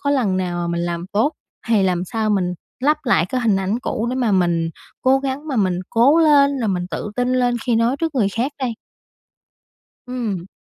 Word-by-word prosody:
có 285 0 0
lần 235 -10 +1
nào 180 -2 -2
mà 175 - -2
mình 170 - -1
làm 170 0 -3
tốt 225 +9 +2 0.3
thì 225 -4 +3
làm 180 -2 +1
sao 215 +3 -1
mình 180 -3 0 0.3
lấp 295 +4 +3
lại 190 -10 +3
cái 255 +6 -2
hình 215 -5 +2
ảnh 195 +4 -1
cũ 235 -3 -2
để - - -2
mà 240 -5 +1
mình 170 -3 +1 0.3
cố 265 +1 +4
gắng 275 +3 -4
mà 270 - -2
mình 185 -4 +1
cố 270 +8 +4
lên, 285 -3 +4
rồi 225 - 0
mình 180 -2 -1
tự 185 +6 -4
tin 250 0 +1
lên 250 -1 +2
khi 240 -2 +2
nói 230 +4 +2
trước 325 -2 -1
người 215 -7 +2
khác 240 +8 -2
đây? 250 -3 -1 1.3
Ừm. 220 -8 -3
230 Hz, 215 wpm, -20 LUFS, 185-260 Hz, 1.3 s, cố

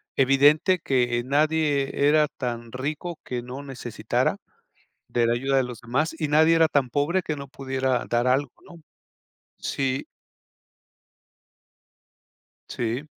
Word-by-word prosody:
evidente 145 +7 +4
que 120 -5 +1
nadie 145 0 +1
era 150 0 +4
tan 120 -4 -5
rico 150 +6 -4
que 125 -1 -4
no 125 +3 -7
necesitara 135 -3 -2 0.7
de 120 -1 +1
la 115 - +2
ayuda 135 +3 0
de 130 - +3
los 125 -2 -7
demás. 140 +8 -1
Y 155 - -1
nadie 160 +2 +5
era 165 -1 +5
tan 135 -3 +1
pobre 150 +8 +1
que 155 - -3
no 140 -1 -8
pudiera 130 -2 -2
dar 120 +1 +1
algo, 130 0 +1
¿no? 170 -1 -14 0.8
Sí. 135 -1 -2 2.6
Sí. 120 +5 -3
135 Hz, 125 wpm, -25 LUFS, 125-150 Hz, 2.6 s, nadie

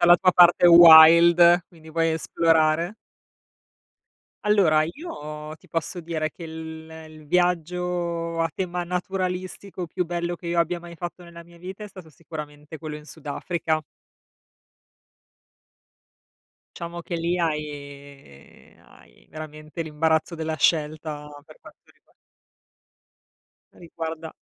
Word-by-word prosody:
dalla 175 0 +7
tua 185 +1 +3
parte 175 0 +6
wild, 170 +1 +8
quindi 160 -3 -17
vuoi 165 0 +1
esplorare? 165 +2 +1 1.5
Allora 180 -8 +3
io 155 - -8
ti - - -23
posso 170 +2 -4
dire 160 -2 -3
che 170 - -11
il 160 0 -9 0.2
il 155 -1 -15
viaggio 175 -1 -1
a 165 - +1
tema 180 -1 -3
naturalistico 185 +1 -4
più 180 +1 -3
bello 175 0 -3
che 170 0 -11
io 170 0 -1
abbia 170 +1 0
mai 170 -1 -12
fatto 175 +1 -7
nella 170 -1 -13
mia 170 0 -19
vita 190 +4 -9
è - - -9
stato 185 -4 -13
sicuramente 150 -1 -10
quello 155 -2 -7
in 150 - -13
Sud 155 -1 -12
Africa. 160 +1 -2 2.9
Diciamo 170 0 -7
che 170 - -6
lì 170 +2 -1
hai 145 - -7
hai - - -22
veramente 155 +1 -8
l'imbarazzo 160 +2 0
della 160 -1 -4
scelta 150 -1 -1 0.2
per 155 0 -17
quanto - - -18
riguar - - -35 1.6
riguarda 165 -1 -7
165 Hz, 120 wpm, -24 LUFS, 155-175 Hz, 2.9 s, wild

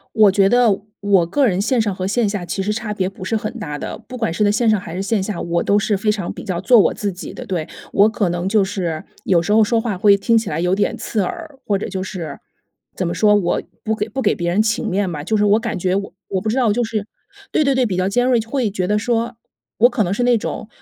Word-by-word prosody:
我 215 -3 +6
觉 195 0 +3
得 245 +2 +4 0.3
我 195 -4 +3
个 275 +9 +2
人 190 -3 +1
线 235 +3 +1
上 205 -3 0
和 185 0 -3
线 220 +2 +1
下 200 -3 -3
其 190 +2 -3
实 210 - -2
差 220 -1 -3
别 190 -3 -1
不 190 -1 -9
是 205 - -2
很 215 0 -2
大 150 -8 -5
的， - - -5
不 255 - -8
管 225 -8 -1
是 210 +5 +1
在 205 - +3
线 225 +2 +1
上 215 - +4
还 170 -2 -8
是 185 - -3
线 195 0 0
下， 195 -3 -4
我 170 0 -1
都 205 - +2
是 205 0 +1
非 210 +2 +1
常 195 -5 -4
比 - - -9
较 175 -2 -2
做 245 +4 +5
我 205 - +4
自 205 -1 -2
己 180 +2 -8
的。 250 - -8
对， 175 -6 -2 0.3
我 205 +2 +5
可 215 -4 0
能 175 +1 -2
就 210 0 +3
是， 180 -5 -3 0.2
有 180 -3 +3
时 205 - -1
候 220 0 +6
说 225 +2 +1
话 220 -5 -2
会 200 +2 +5
听 230 +3 +2
起 220 -2 0
来 155 +2 -2
有 180 +2 +2
点 205 - 0
刺 210 -3 -1
耳， 320 - -6
或 200 -3 +1
者 - - -4
就 190 -1 -4
是， 175 -7 -6 0.6
怎 180 -2 -2
么 - - -2
说， 210 -1 +4
我 190 -4 +1 0.2
不 220 0 0
给 210 - -2
不 265 +5 -4
给 210 - +2
别 170 -1 -2
人 190 +5 +2
情 225 +1 0
面 195 -2 0
吧。 150 -2 -5
就 220 - 0
是 210 - +3
我 205 +2 +4
感 230 -3 -3
觉 185 +1 0
我 200 0 -4 0.2
我 190 - -1
不 215 - -1
知 255 - 0
道 235 -4 +3
就 240 0 +1
是 215 -2 -3 0.4
对， 310 - +2
对， 275 -1 +2
对， 255 -2 +2
比 185 -3 -2
较 185 0 +1
尖 245 +5 +1
锐， 255 -2 +3
会 230 0 -1
觉 185 -2 -2
得 210 +1 +1
说 235 +1 -1 0.4
我 240 - +6
可 245 -3 +1
能 185 -1 -1
是 245 - -1
那 245 -1 +4
种， 215 - -5
205 Hz, 310 characters per minute, -19 LUFS, 185-225 Hz, 0.6 s, 我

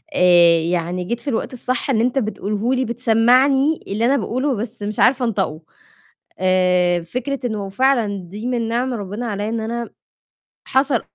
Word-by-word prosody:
آآ، 175 -2 +6
يعني 175 +2 -2
جيت 235 +6 -3
في 260 - -18
الوقت 235 +1 -2
الصح 255 +2 -3
إن 225 -5 +2
أنت 250 +3 +1
بتقوله 215 +1 -2
لي 260 0 0
بتسمعني 250 +5 +3
اللي 215 +4 -1
أنا 275 +3 +3
باقوله 260 +2 -1
بس 215 0 -6
مش 210 0 -4
عارفة 255 0 +3
أنطقه. 190 -8 -2 0.8
آآ، 180 -1 +2
فكرة 255 +9 -4
إنه 210 -3 -4
وفعلًا 220 0 +1
دي 210 +5 -7
من 240 -2 -1
نِعَم 245 +2 -1
ربِّنا 205 +2 -5
علي 205 0 -3
إن 230 0 -2
أنا 235 +1 -4 0.8
حصل 265 -2 +2
225 Hz, 160 wpm, -20 LUFS, 195-255 Hz, 0.8 s, آآ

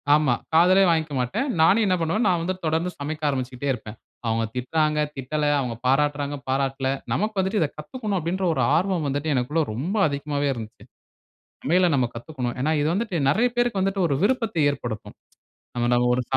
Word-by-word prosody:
ஆமா, 150 -5 +3 0.2
காதிலே 185 +3 +6
வாங்கிக்கமாட்டேன். 160 - -1
நானும் 205 +7 +5
என்ன 185 - +3
பண்ணுவேன், 200 +8 0
நான் 175 -2 +1
வந்து 185 +2 -1
தொடர்ந்து 165 +3 0
சமைக்க 155 +2 -5
ஆரம்பிச்சுட்டே 130 0 -3
இருப்பேன். 110 -2 -8 0.3
அவுங்க 115 0 +1
திட்டுறாங்க, 150 +4 0 0.2
திட்டல, 150 +3 -2
அவுங்க 125 -3 -3
பாராட்டுறாங்க, 145 +1 +1
பாராட்டல. 135 0 0 0.2
நமக்கு 215 0 -1
வந்துட்டு 190 +1 +1
இதை 150 - +1
கத்துக்கணும், 205 +5 -4
அப்ிடின்ற 180 +4 -2
ஒரு 130 - 0
ஆர்வம் 175 -3 0
வந்துட்டு 145 +2 -1
எனக்குள்ள 150 +6 +1
ரொம்ப 170 - -2
அதிகமாகவே 145 0 -2
இருந்துச்சு. 110 -3 -9 0.8
சமையல 180 +5 +3
நம்ம 125 -3 +2
கத்துக்கணும். 125 -1 -4
ஏன்னா, 155 +3 +1
இது 150 - +1
வந்துட்டு 205 -2 -2
நிறைய 230 - +3
பேருக்கு 240 -5 +1
வந்துட்டு 195 -1 +1
ஒரு 140 - +1
விருப்பத்தை 225 -7 +1
ஏற்படுத்தும். 120 -6 -6 0.6
நம்ம 120 0 +1
நம்ம 120 0 +3
ஒரு 125 - 0
150 Hz, 165 wpm, -24 LUFS, 135-185 Hz, 0.8 s, காதிலே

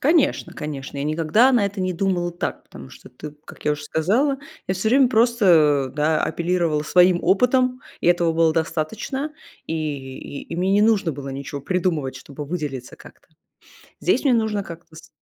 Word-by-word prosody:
Конечно, 310 +1 +2
конечно, 140 -2 -6
я 140 - -2
никогда 165 - +3
на 235 -5 +3
это 200 0 -3
не 185 0 0
думала 175 -1 -1
так, 175 - -4
потому 70 -1 -12
что, - - -14
ты, 140 +4 -9
как - - -13
я 150 - +2
уже 150 0 -6
сказала, 230 - +1 0.3
я 185 - -1
всё 190 +4 -1
время 260 +2 +5
просто, 190 - +4
а, - - -7
да, 150 +3 0
апеллировала 170 -2 0
своим 180 +3 +4
опытом, 250 +7 +2 0.2
и - - -3
этого 175 -1 +3
было 165 0 +3
достаточно, 175 - -2 0.3
и 160 - -3 0.4
и 140 - -8
и 165 - -7
мне 185 +2 +1
не 205 +1 +4
нужно 210 -6 +2
было 140 0 -7
ничего 140 +1 -6
придумывать, 160 -5 -1
чтобы 140 +3 -9
выделиться 145 -5 -5
как-то. - - -17 0.7
Здесь - - +1
мне 275 -4 +4
нужно 220 -3 0
как-то 170 -2 -11
с 160 - -13
175 Hz, 180 wpm, -22 LUFS, 150-210 Hz, 0.7 s, время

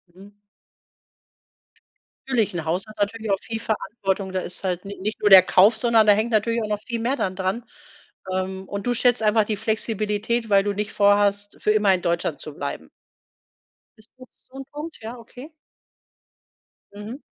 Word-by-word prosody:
Mhm. 200 +2 -14 2.0
Natürlich, 225 -7 +1
'n 165 -2 -4
Haus 180 +6 0
hat 215 - -13
natürlich 215 +1 -2
auch 195 - +1
viel 225 -1 -5
Verantwortung, 200 -3 -3
da 185 - -1
ist 180 - -8
halt 180 0 -2
nich 200 0 -8
nicht 215 +3 -4
nur 205 - +3
der 190 -1 +11
Kauf, 200 +4 +4
sondern 230 -1 +4
da 205 - +8
hängt 220 +3 0
natürlich 230 +2 +1
auch 215 - -3
noch 210 -1 -2
viel 235 -2 -4
mehr 250 +4 0
dann 185 -8 -2
dran. 190 +5 -2 0.7
Ähm, 190 0 -3
und 200 +1 -5
du 245 - +2
schätzt 245 -1 +2
einfach 215 0 +3
die 210 -1 -2
Flexibilität, 220 +1 -1
weil 195 -1 +4
du 205 0 -1
nicht 210 +1 -4
vor 205 0 +4
hast, 205 0 0
für 210 - +2
immer 205 -2 +4
in 180 - -1
Deutschland 170 0 -1
zu - - -8
bleiben? - - -6 1.1
Ist 215 - -17
das 255 -1 -13 0.2
so 265 - -20
'n 270 - -7
Punkt? 305 +3 -7
Ja, 230 +3 -7
okay. 250 +6 -12 1.4
Mhm. 220 +7 -8
210 Hz, 185 wpm, -23 LUFS, 195-230 Hz, 2.0 s, der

